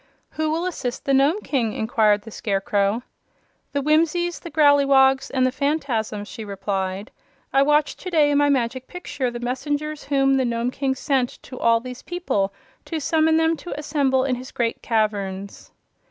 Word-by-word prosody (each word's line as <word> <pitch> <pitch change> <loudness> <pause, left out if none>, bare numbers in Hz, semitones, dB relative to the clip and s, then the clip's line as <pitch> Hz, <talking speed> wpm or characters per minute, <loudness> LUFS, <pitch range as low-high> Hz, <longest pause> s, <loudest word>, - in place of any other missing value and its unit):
"Who 315 0 -1
will 330 +3 -1
assist 265 -9 -4
the 275 - +2
Nome 285 +9 +3
King?" 235 -7 0
inquired 215 -2 +2
the 225 - -10
Scarecrow. 205 +2 0 0.7
"The 280 -1 -1
Whimsies, 330 +3 +1
the 340 - -9
Growleywogs 280 -3 +4
and 260 -2 +1
the 255 - +2
Phanfasms," 250 -8 -2
she 220 - -8
replied. 195 0 -3 0.4
"I 270 - +5
watched 295 +1 +2
to 365 - -6
day 305 -4 +3
in 285 - +3
my 290 0 +3
Magic 260 -1 0
Picture 290 -7 -4
the 240 0 -6
messengers 290 +5 -3
whom 270 -1 +2
the 260 - +2
Nome 235 +1 -1
King 270 0 -1
sent 265 -2 0
to 255 - -9
all 230 0 +4
these 250 +1 -8
people 275 - -1 0.3
to 325 - -3
summon 315 +1 +2
them 325 0 +2
to 350 - -7
assemble 275 -3 +1
in 265 -1 0
his 255 +1 -5
great 230 -2 -2
caverns." 200 -3 -2
265 Hz, 170 wpm, -23 LUFS, 230-295 Hz, 0.7 s, I